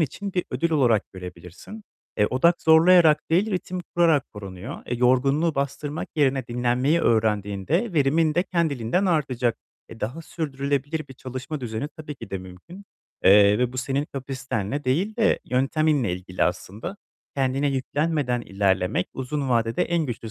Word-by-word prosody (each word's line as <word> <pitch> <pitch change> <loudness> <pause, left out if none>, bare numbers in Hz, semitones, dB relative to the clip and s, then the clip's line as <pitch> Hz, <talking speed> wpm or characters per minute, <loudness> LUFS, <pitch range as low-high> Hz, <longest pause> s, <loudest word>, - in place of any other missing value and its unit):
için 195 +6 -2
bir 180 - 0
ödül 170 0 -1
olarak 125 -9 +2
görebilirsin. 90 - -10 0.3
E, 105 - +3
odak 170 +9 +2
zorlayarak 160 0 +6
değil, 190 +7 +2
ritim 185 -1 -3
kurarak 165 -5 +2
korunuyor. 95 -3 -8
E, 120 - -2
yorgunluğu 135 +6 +2
bastırmak 140 +2 -3
yerine 135 -4 +2
dinlenmeyi 125 +6 +1
öğrendiğinde 110 - +1
verimin 155 +1 +2
de 175 - +3
kendiliğinden 170 - 0
artacak. 130 -9 0 0.3
E, 115 - -12
daha 125 +10 -4
sürdürülebilir 145 -1 -3
bir 135 - -11
çalışma 130 +4 -6
düzeni, 115 +4 -4
tabii 150 -1 -9
ki 130 - -11
de 95 - -3
mümkün. 95 - -12 0.4
Eee, 100 +1 +6
ve 125 0 0
bu - - -8
senin 135 +2 -1
kapasitenle 135 -2 -4
değil 180 - 0
de 225 - +3
yönteminle 135 - +1
ilgili 90 0 -4
aslında. 95 - -4 0.4
Kendine 135 +1 +1
yüklenmeden 140 -1 -1
ilerlemek 95 -3 0
uzun 135 +1 -3
vadede 115 -2 +1
en 170 -2 0
güçlü 115 -3 -6
135 Hz, 145 wpm, -24 LUFS, 115-160 Hz, 0.4 s, zorlayarak